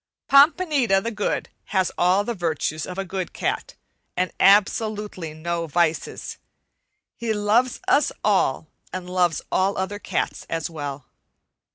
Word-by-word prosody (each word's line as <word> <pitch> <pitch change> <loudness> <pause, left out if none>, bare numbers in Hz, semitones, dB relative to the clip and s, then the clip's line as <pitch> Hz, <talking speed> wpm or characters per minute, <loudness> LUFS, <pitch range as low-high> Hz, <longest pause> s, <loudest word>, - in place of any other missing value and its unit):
Pompanita 280 - +5
the 230 +4 -3
Good 210 -2 -2 0.2
has 190 -3 0
all 185 +3 +3
the 235 - -2
virtues 160 -4 -2
of 180 - -7
a 195 - -2
good 185 -1 -4
cat, - - -3 0.4
and 185 +1 0
absolutely 205 -4 +2
no 170 +1 -3
vices. 165 +1 -1 0.8
He 230 -2 -1
loves 220 +4 +2
us 290 - +3
all 190 -9 +2 0.3
and 185 -1 -5
loves 180 -2 +1
all 195 +2 +1
other 190 +2 -3
cats - - -3
as 165 0 -3
well. 145 -3 -6
190 Hz, 135 wpm, -23 LUFS, 170-210 Hz, 0.8 s, Pompanita